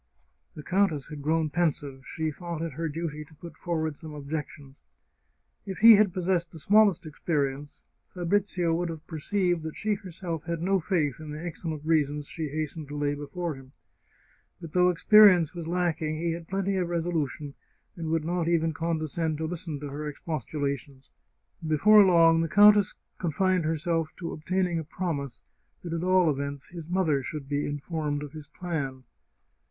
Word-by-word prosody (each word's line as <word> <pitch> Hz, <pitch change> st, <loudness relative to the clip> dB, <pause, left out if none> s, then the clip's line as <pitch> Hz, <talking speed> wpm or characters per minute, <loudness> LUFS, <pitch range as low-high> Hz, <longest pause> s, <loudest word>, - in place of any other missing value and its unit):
The 150 Hz, -, -8 dB
countess 185 Hz, -7 st, +1 dB
had 150 Hz, -1 st, -7 dB
grown 155 Hz, +1 st, +1 dB
pensive; 145 Hz, -5 st, -1 dB
she 160 Hz, -1 st, -2 dB
thought 170 Hz, 0 st, -5 dB
it 165 Hz, -3 st, -4 dB
her 165 Hz, +3 st, -3 dB
duty 155 Hz, -1 st, -4 dB
to 155 Hz, +1 st, -19 dB
put 170 Hz, +3 st, -11 dB
forward 160 Hz, -3 st, -2 dB
some 155 Hz, 0 st, -10 dB
objections. 145 Hz, -1 st, -6 dB, 0.9 s
If 195 Hz, -2 st, -6 dB
he 230 Hz, 0 st, +10 dB
had 205 Hz, -2 st, +5 dB
possessed 180 Hz, -1 st, 0 dB
the 165 Hz, -, -12 dB
smallest 200 Hz, +1 st, +4 dB
experience 145 Hz, -2 st, -3 dB, 0.3 s
Fabrizio 180 Hz, -1 st, 0 dB
would 170 Hz, +1 st, -1 dB
have 160 Hz, -1 st, -7 dB
perceived 175 Hz, +2 st, -1 dB
that 160 Hz, 0 st, -6 dB
she 215 Hz, 0 st, 0 dB
herself 175 Hz, -4 st, -5 dB
had 170 Hz, 0 st, -2 dB
no 190 Hz, +3 st, +2 dB
faith 160 Hz, -7 st, 0 dB
in 155 Hz, -1 st, -8 dB
the 155 Hz, +3 st, -6 dB
excellent 160 Hz, -2 st, -5 dB
reasons 150 Hz, -2 st, +1 dB
she 160 Hz, +1 st, -5 dB
hastened 155 Hz, +1 st, -4 dB
to 145 Hz, +1 st, -6 dB
lay 145 Hz, 0 st, 0 dB
before 160 Hz, +4 st, -4 dB
him. 135 Hz, -1 st, -14 dB, 0.9 s
But 165 Hz, -3 st, -10 dB
though 180 Hz, 0 st, +5 dB
experience 180 Hz, -2 st, +6 dB
was 170 Hz, -2 st, -6 dB
lacking, 165 Hz, -3 st, -1 dB
he 170 Hz, +1 st, -1 dB
had 165 Hz, 0 st, -6 dB
plenty 195 Hz, 0 st, -1 dB
of 180 Hz, -2 st, -1 dB
resolution, 160 Hz, -4 st, -2 dB, 0.4 s
and 165 Hz, -2 st, -5 dB
would 160 Hz, -1 st, 0 dB
not 175 Hz, 0 st, -1 dB
even 165 Hz, -1 st, +2 dB
condescend 160 Hz, 0 st, -2 dB
to 160 Hz, -, -2 dB
listen 165 Hz, -2 st, -4 dB
to 145 Hz, -, -5 dB
her 150 Hz, +2 st, -5 dB
expostulations. 140 Hz, -3 st, -4 dB, 0.6 s
Before 205 Hz, +8 st, +7 dB
long 165 Hz, -3 st, +5 dB
the 165 Hz, -, -1 dB
countess 205 Hz, +1 st, +6 dB, 0.2 s
con 170 Hz, -4 st, -2 dB
fined 185 Hz, -1 st, +2 dB
herself 165 Hz, 0 st, 0 dB
to 170 Hz, -, -5 dB
obtaining 175 Hz, +2 st, -1 dB
a -, -, -4 dB
promise 145 Hz, -6 st, -4 dB, 0.4 s
that 170 Hz, -2 st, -5 dB
at 165 Hz, 0 st, -2 dB
all 185 Hz, -3 st, +4 dB
events 140 Hz, 0 st, -5 dB
his 170 Hz, -3 st, -9 dB
mother 170 Hz, -6 st, +1 dB
should 140 Hz, +1 st, -6 dB
be 145 Hz, +1 st, -1 dB
informed 145 Hz, 0 st, -3 dB
of 145 Hz, -, -8 dB
his 155 Hz, -1 st, -10 dB
plan. 145 Hz, -5 st, -4 dB
165 Hz, 170 wpm, -27 LUFS, 150-175 Hz, 0.9 s, he